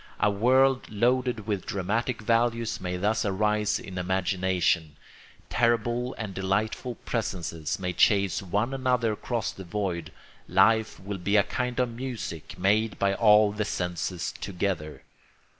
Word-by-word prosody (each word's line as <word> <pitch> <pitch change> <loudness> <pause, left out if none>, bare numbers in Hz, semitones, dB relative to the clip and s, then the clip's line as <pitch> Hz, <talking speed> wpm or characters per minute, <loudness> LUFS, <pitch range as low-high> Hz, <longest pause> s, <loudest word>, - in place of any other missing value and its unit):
A 105 - +3
world 130 +5 +3
loaded 120 +1 +1
with 100 -4 -3
dramatic 110 +5 -1
values 115 0 +1
may 90 -1 -3
thus 105 +4 +1
arise 105 +1 +1
in 95 -2 -7
imagination; 90 -3 0 0.5
terrible 120 +1 +1
and 105 -4 -5
delightful 105 +6 -1
presences 85 -8 -2
may 90 -2 -3
chase 100 -2 +3
one 105 +7 -1
another 125 -4 +1
across 115 +1 -2
the 95 - -10
void; 90 -3 -3 0.4
life 110 +4 +3
will 100 +1 -5
be 100 +4 +2
a 100 - +6
kind 125 +4 -3
of 125 -2 0
music 115 - -6
made 105 +4 +2
by 100 0 +2
all 105 0 +5
the 105 +1 -2
senses 90 -2 -3
together. 90 -5 -3
105 Hz, 135 wpm, -27 LUFS, 95-115 Hz, 0.5 s, a